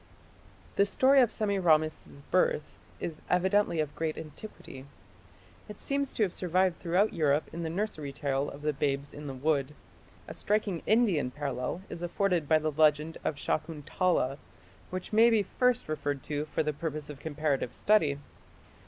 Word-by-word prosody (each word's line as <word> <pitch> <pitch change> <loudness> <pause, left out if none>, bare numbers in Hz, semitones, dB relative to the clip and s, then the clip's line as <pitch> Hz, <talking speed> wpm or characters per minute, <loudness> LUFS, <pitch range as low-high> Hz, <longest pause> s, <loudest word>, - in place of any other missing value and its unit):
The 200 - +5
story 265 +6 +5
of 240 - +3
Semiramis's 160 -8 +1
birth 180 -4 +2 0.3
is 160 -3 -5
evidently 185 -1 +2
of 150 -2 -2
great 160 -1 -2
antiquity. 150 -4 -10 0.8
It 210 - -9
seems 280 -1 -1
to 215 - +2
survive 185 0 +1
throughout 185 +5 +1
Europe 150 -3 +1
in 170 - -4
the 165 - -2
nursery 165 -6 -3
tale 140 -1 -1
of 145 +1 -10
the 150 0 +1
"Babes 140 0 -1
in 145 0 -8
the 135 - -4
Wood". 145 +1 0 0.5
A - - -6
striking 205 -4 0
Indian 205 - +3
parallel 140 +4 -4
is 170 - -7
afforded 175 -3 0
by 160 - +6
the 155 0 -1
legend 155 +1 +2
of 155 - -1
Shakuntala, 155 0 -1 0.5
which 185 +3 -5
may 225 +2 +7
be 220 -3 +3
first 250 +5 +1
referred 145 -3 -2
to 150 0 -2
for 155 - -1
the 150 0 -1
purpose 155 -1 -4
of 140 - -11
comparative 145 -5 -1
study. 180 -10 +2
160 Hz, 155 wpm, -30 LUFS, 145-190 Hz, 0.8 s, may